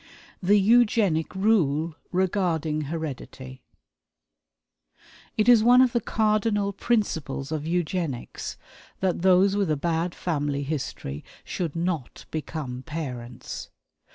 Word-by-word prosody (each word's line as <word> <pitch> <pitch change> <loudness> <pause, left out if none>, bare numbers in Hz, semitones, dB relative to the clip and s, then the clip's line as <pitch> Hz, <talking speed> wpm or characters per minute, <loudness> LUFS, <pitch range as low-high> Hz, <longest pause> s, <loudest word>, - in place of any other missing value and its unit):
The 200 +3 +4
Eugenic 210 -7 +3
Rule 170 -6 +2 0.2
Regarding 175 -5 0
Heredity. 135 -4 -6 1.8
It 215 +1 +2
is 235 -3 +7
one 245 +2 +7
of 255 -2 +5
the 235 - +1
cardinal 210 -2 +1
principles 160 - -1
of 155 -1 -3
Eugenics 170 -6 -2 0.4
that 185 -3 0
those 190 +2 +5
with 200 -4 +1
a 155 - +1
bad 170 +3 -1
family 145 -4 -1
history 135 - -4 0.2
should 170 -4 -3
not 165 -6 -3
become 150 -5 -4
parents. 130 -6 -6
170 Hz, 105 wpm, -26 LUFS, 150-200 Hz, 1.8 s, is